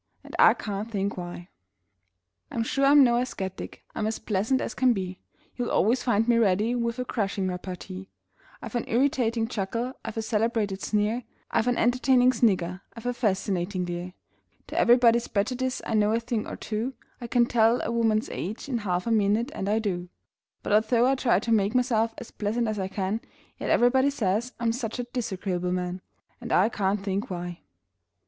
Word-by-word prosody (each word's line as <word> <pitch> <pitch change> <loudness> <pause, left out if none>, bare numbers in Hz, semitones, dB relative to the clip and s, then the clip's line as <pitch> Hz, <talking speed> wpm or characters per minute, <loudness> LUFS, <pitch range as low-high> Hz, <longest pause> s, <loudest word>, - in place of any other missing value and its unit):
And - - -9
I - - +7
can't 205 +1 -4
think 200 -2 -2
why! 175 0 -7 1.0
I'm 230 - -1
sure 275 +4 +1
I'm 285 0 +7
no 240 -2 +4
ascetic: 195 -7 -4
I'm 215 - -1
as 220 - -2
pleasant 215 +6 0
as - - -3
can 255 -2 +3
be; 185 -3 -4 0.4
You'll 245 -1 -2
always 240 +4 +2
find 225 -3 +1
me 235 -1 +4
ready 210 +2 +2
with 235 0 -1
a 250 - -2
crushing 200 -5 -1
repartee; 185 +1 -6 0.5
I've - - -7
an 240 - -1
irritating 235 -3 +1
chuckle; 230 +3 -3
I've 225 0 -6
a 225 - -1
celebrated 215 -3 0
sneer; 215 +3 0 0.3
I've 230 +1 +1
an 245 - +2
entertaining 250 +1 +4
snigger; 190 -6 +1
I've 230 - -10
a 245 - 0
fascinating 190 -4 -1
leer; 175 +1 -5 0.6
To - - -1
everybody's 235 -1 +5
prejudice 250 +5 -1
I - - -3
know 210 0 +3
a 230 - +2
thing 235 -2 -3
or - - -5
two; 230 +5 -3 0.3
I 240 - -5
can 240 0 +3
tell 230 0 +3
a - - -2
woman's 225 -2 +1
age 210 +9 -5
in 250 -4 -1
half 180 -4 -1
a 230 - -1
minute 220 +4 +2
and 195 - -3
I 215 - +2
do 180 -5 -2 0.5
But - - -1
although 225 +3 +4
I 265 - +4
try 245 -8 +2
to 230 - -2
make 210 +1 +2
myself 230 -3 +2
as 230 - -9
pleasant 225 +3 -1
as 215 -1 -2
I 190 - -1
can, 195 +3 -2 0.4
Yet - - -3
everybody 260 +3 +4
says 230 -2 -1
I'm 230 -1 +1
such 230 -1 -4
a 245 - -2
disagreeable 190 -7 -3
man! 180 0 -3 0.4
And - - -6
I 195 +5 +4
can't 200 -2 -1
think 200 +4 -2
why! 175 -1 -5
220 Hz, 185 wpm, -26 LUFS, 195-240 Hz, 1.0 s, I